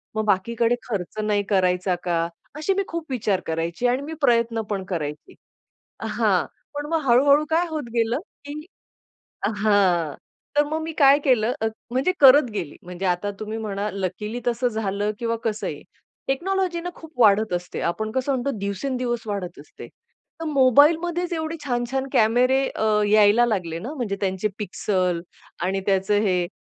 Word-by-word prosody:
मग 215 Hz, 0 st, 0 dB
बाकीकडे 230 Hz, +4 st, +1 dB
खर्च 205 Hz, -2 st, -4 dB
नाही 205 Hz, -1 st, +1 dB
करायचा 185 Hz, -2 st, +2 dB
का?" 170 Hz, -1 st, 0 dB, 0.3 s
अशी 310 Hz, +6 st, 0 dB
मी 395 Hz, +1 st, 0 dB
खूप 335 Hz, -1 st, -4 dB
विचार 210 Hz, -6 st, 0 dB
करायची 165 Hz, +8 st, -1 dB
आणि 250 Hz, +2 st, +1 dB
मी 310 Hz, +3 st, -6 dB
प्रयत्न 235 Hz, -3 st, +2 dB
पण 200 Hz, -2 st, -2 dB
करायची. 155 Hz, -, -5 dB, 0.7 s
हां. -, -, +1 dB, 0.3 s
पण 290 Hz, 0 st, -3 dB
मग 325 Hz, -1 st, +1 dB
हळू-हळू 280 Hz, +4 st, +5 dB
काय 330 Hz, +2 st, +2 dB
होत 310 Hz, -2 st, -3 dB
गेलं, 230 Hz, +2 st, +1 dB, 0.3 s
की 285 Hz, -, -7 dB, 1.1 s
हां, 190 Hz, -7 st, +2 dB, 0.4 s
तर 295 Hz, -, +6 dB
मग 310 Hz, +2 st, -2 dB
मी 320 Hz, +1 st, -4 dB
काय 275 Hz, 0 st, +7 dB
केलं 240 Hz, -4 st, +3 dB
म -, -, +3 dB, 0.2 s
म्हणजे 265 Hz, +8 st, +2 dB
करत 270 Hz, -2 st, +7 dB
गेली. 175 Hz, -8 st, -4 dB
म्हणजे 180 Hz, +2 st, -6 dB
आता 180 Hz, +3 st, 0 dB
तुम्ही 215 Hz, +1 st, -4 dB
म्हणा 210 Hz, -2 st, -3 dB
लकिली 210 Hz, +5 st, -4 dB
तसं 240 Hz, +1 st, +1 dB
झालं 210 Hz, -2 st, -1 dB
किंवा 230 Hz, -1 st, -1 dB
कसंही. 215 Hz, -2 st, -3 dB, 0.5 s
टेक्नॉलॉजीना 355 Hz, +4 st, -1 dB
खूप 320 Hz, -1 st, -12 dB
वाढत 215 Hz, -2 st, +4 dB
असते. 175 Hz, 0 st, -3 dB
आपण 215 Hz, +6 st, -2 dB
कसं 260 Hz, +3 st, -1 dB
म्हणतो 260 Hz, +2 st, -1 dB
दिवसेंदिवस 240 Hz, +4 st, -2 dB
वाढत 190 Hz, -5 st, -4 dB
असते. 145 Hz, -, -12 dB, 0.5 s
तर 325 Hz, -, -4 dB
मोबाईलमध्येच 315 Hz, +6 st, +3 dB
एवढे 320 Hz, 0 st, -3 dB
छान-छान 260 Hz, +1 st, -1 dB
कॅमेरे 250 Hz, +4 st, +4 dB
अ, -, -, -4 dB, 0.3 s
यायला 215 Hz, +2 st, +5 dB
लागले 180 Hz, -8 st, -2 dB
ना, 245 Hz, -, -6 dB
म्हणजे 240 Hz, -9 st, -2 dB
त्यांचे 190 Hz, +1 st, 0 dB
पिक्सल 185 Hz, -3 st, -1 dB, 0.4 s
आणि 190 Hz, +2 st, 0 dB
त्याचं 195 Hz, +1 st, +2 dB
हे. 180 Hz, -4 st, +1 dB
225 Hz, 155 wpm, -23 LUFS, 195-270 Hz, 1.1 s, काय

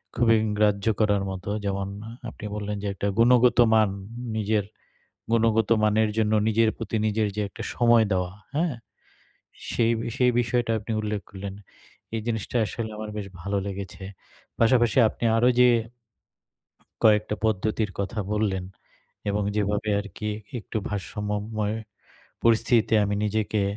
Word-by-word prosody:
খুবই 115 Hz, -1 st, +4 dB, 0.2 s
গ্রাহ্য 105 Hz, -1 st, +2 dB
করার 105 Hz, -2 st, +2 dB
মতো, 95 Hz, +1 st, -6 dB, 0.2 s
যেমন 100 Hz, 0 st, -1 dB, 0.4 s
আপনি 110 Hz, -, -10 dB
বললেন 105 Hz, 0 st, -3 dB
যে -, -, -1 dB
একটা 100 Hz, -, -2 dB
গুণগত 125 Hz, +1 st, +5 dB, 0.2 s
মান, 110 Hz, -2 st, +5 dB, 0.5 s
নিজের 105 Hz, -1 st, 0 dB, 0.7 s
গুণগত 115 Hz, -2 st, +3 dB
মানের 110 Hz, 0 st, +3 dB
জন্য 110 Hz, -1 st, +2 dB
নিজের 110 Hz, 0 st, +3 dB
প্রতি 110 Hz, -, -3 dB
নিজের 110 Hz, 0 st, +1 dB
যে 105 Hz, -, -1 dB
একটা -, -, -8 dB
সময় 120 Hz, -2 st, +5 dB
দেওয়া 90 Hz, -1 st, 0 dB, 0.2 s
হ্যাঁ, 160 Hz, -2 st, +1 dB, 1.0 s
সেই 115 Hz, -1 st, +2 dB
বি -, -, -4 dB
সেই 125 Hz, -2 st, +4 dB
বিষয়টা 120 Hz, 0 st, 0 dB
আপনি 110 Hz, +2 st, -5 dB
উল্লেখ 105 Hz, -1 st, -2 dB
করলেন। 100 Hz, 0 st, -6 dB, 0.6 s
এই 115 Hz, -, -1 dB
জিনিসটা 115 Hz, +1 st, -2 dB
আসলে 110 Hz, +1 st, -4 dB
আমার 110 Hz, 0 st, -6 dB
বেশ 105 Hz, -2 st, -4 dB
ভালো 100 Hz, +2 st, -2 dB
লেগেছে। 100 Hz, -1 st, -6 dB, 0.5 s
পাশাপাশি 120 Hz, +1 st, +3 dB
আপনি 120 Hz, -, -6 dB
আরো 120 Hz, +2 st, +4 dB
যে 125 Hz, -, +7 dB, 1.4 s
কয়েকটা 105 Hz, -1 st, +4 dB
পদ্ধতির 110 Hz, 0 st, 0 dB
কথা 105 Hz, +3 st, -2 dB
বললেন 105 Hz, -3 st, 0 dB, 0.7 s
এবং 105 Hz, +1 st, 0 dB
যেভাবে 105 Hz, 0 st, 0 dB
আরকি 105 Hz, +1 st, -5 dB, 0.3 s
একটু 110 Hz, -, -5 dB
ভারসাম্যময় 105 Hz, +2 st, -3 dB, 0.7 s
পরিস্থিতিতে 115 Hz, 0 st, +3 dB
আমি 100 Hz, 0 st, -1 dB
নিজেকে 105 Hz, 0 st, 0 dB
110 Hz, 135 wpm, -25 LUFS, 100-115 Hz, 1.4 s, যে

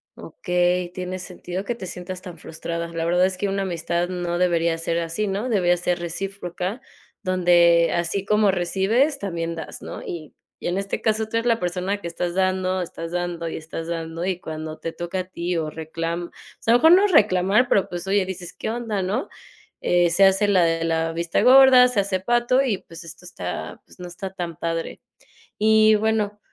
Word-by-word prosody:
Okey, 180 Hz, 0 st, -1 dB
tiene 185 Hz, +1 st, -5 dB
sentido 180 Hz, +1 st, -6 dB
que 235 Hz, +4 st, -3 dB
te 210 Hz, -, -8 dB
sientas 180 Hz, +1 st, -7 dB
tan 180 Hz, -3 st, -10 dB
frustrada. 170 Hz, +1 st, -5 dB
La 165 Hz, 0 st, -3 dB
verdad 180 Hz, +2 st, +3 dB
es 185 Hz, 0 st, -2 dB
que 200 Hz, -, -1 dB
una 195 Hz, 0 st, -1 dB
amistad 175 Hz, -1 st, -2 dB
no 175 Hz, -1 st, -2 dB
debería 170 Hz, -2 st, +1 dB
ser 165 Hz, 0 st, -1 dB
así, 170 Hz, +6 st, -2 dB
¿no? 200 Hz, +5 st, -2 dB
Debería 180 Hz, -7 st, +2 dB
ser 175 Hz, 0 st, -1 dB
recíproca 185 Hz, +4 st, -4 dB, 0.4 s
donde 175 Hz, -2 st, +4 dB
así 170 Hz, +3 st, -1 dB
como 210 Hz, 0 st, +3 dB
recibes 200 Hz, -, +1 dB
también 170 Hz, -4 st, -3 dB
das, 160 Hz, -, -8 dB
¿no? -, -, -7 dB
Y 160 Hz, -3 st, -7 dB, 0.3 s
y -, -, -4 dB
en 175 Hz, +2 st, -1 dB
este 195 Hz, 0 st, -3 dB
caso, 220 Hz, 0 st, +1 dB
tú 220 Hz, -, -6 dB
eres 230 Hz, -, -1 dB
la 230 Hz, -1 st, +2 dB
persona 180 Hz, +3 st, -2 dB
que 170 Hz, -, -5 dB
estás 170 Hz, +1 st, -3 dB
dando, 185 Hz, 0 st, 0 dB
estás 165 Hz, -1 st, -6 dB
dando 175 Hz, -1 st, -3 dB
y -, -, -5 dB
estás 160 Hz, +1 st, -7 dB
dando 165 Hz, 0 st, -4 dB
y 185 Hz, -2 st, -1 dB
cuando 155 Hz, -1 st, -6 dB
te 165 Hz, -, -5 dB
toca 175 Hz, +2 st, -4 dB
a -, -, -1 dB
ti 175 Hz, -1 st, -3 dB
o 155 Hz, -2 st, -2 dB
reclam 165 Hz, +2 st, -4 dB
o -, -, -22 dB, 0.3 s
sea 230 Hz, -, +2 dB
a -, -, +7 dB
lo -, -, -5 dB
mejor 325 Hz, +2 st, +8 dB
no 390 Hz, +3 st, +6 dB
reclamar, 210 Hz, -, +4 dB
pero, 195 Hz, -, +3 dB
pues, 175 Hz, 0 st, -5 dB
oye, 195 Hz, 0 st, +2 dB
dices: 185 Hz, -2 st, -6 dB
"¿Qué -, -, -5 dB
onda?", 225 Hz, -3 st, -2 dB
¿no? 210 Hz, +9 st, -2 dB, 0.5 s
Eh, 175 Hz, -1 st, +3 dB
se 190 Hz, +4 st, +4 dB
hace 195 Hz, +2 st, +4 dB
la 185 Hz, -4 st, +4 dB
de 165 Hz, 0 st, +1 dB
la 165 Hz, 0 st, 0 dB
vista 170 Hz, 0 st, -1 dB
gorda, 255 Hz, 0 st, +8 dB
se 245 Hz, -5 st, +1 dB
hace 195 Hz, -1 st, -1 dB
pato 240 Hz, +6 st, +2 dB
y, 235 Hz, -8 st, 0 dB
pues, 165 Hz, -1 st, -12 dB
esto 165 Hz, +2 st, -11 dB
está, 90 Hz, -, -6 dB
pues, -, -, -19 dB
no 180 Hz, -, -6 dB
está 190 Hz, +2 st, -7 dB
tan 170 Hz, -3 st, -5 dB
padre. 165 Hz, +1 st, -3 dB, 0.6 s
Y 215 Hz, 0 st, +5 dB
bueno, 210 Hz, -1 st, 0 dB
180 Hz, 205 wpm, -23 LUFS, 170-200 Hz, 0.6 s, mejor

